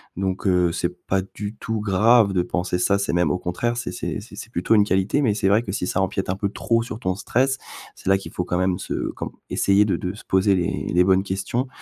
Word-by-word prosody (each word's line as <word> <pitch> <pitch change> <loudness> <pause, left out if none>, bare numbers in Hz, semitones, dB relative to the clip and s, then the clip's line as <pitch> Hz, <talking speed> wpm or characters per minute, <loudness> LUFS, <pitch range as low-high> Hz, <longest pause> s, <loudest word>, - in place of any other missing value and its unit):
donc 95 +1 -2
heu, 90 -2 +3
c'est 90 +1 -4
pas 95 0 +1
du 105 0 -5
tout 110 -2 -3
grave 105 +2 +4
de 90 -2 +1
penser 90 0 -1
ça, 100 +2 +3
c'est 100 - -1
même 85 -2 +2
au 75 - +1
contraire, 105 +7 -2
c'est 120 - -4
c'est - - -4
c'est - - -13
c'est - - -8
plutôt 90 +6 0
une 105 -1 +5
qualité, 95 +9 +1
mais 110 -6 +2
c'est 95 -2 +1
vrai 110 +3 +3
que 95 -4 -5
si 90 - -2
ça 90 - -1
empiète 95 0 -2
un 95 - -1
peu 100 - 0
trop 115 +3 0
sur 115 -1 -6
ton 95 -3 -1
stress, 130 +8 0 0.4
c'est - - -13
là 95 - +5
qu'il 95 - -9
faut 90 - -3
quand 90 - -1
même 95 0 +1
se - - -3
comme - - -6 0.2
essayer 100 +1 +3
de 105 - 0
de 90 +1 -4
se - - -12
poser 95 +1 +3
les 90 -2 -1
les 90 - +5
bonnes 95 +1 +3
questions, 100 +7 -2
95 Hz, 260 wpm, -23 LUFS, 90-105 Hz, 0.4 s, une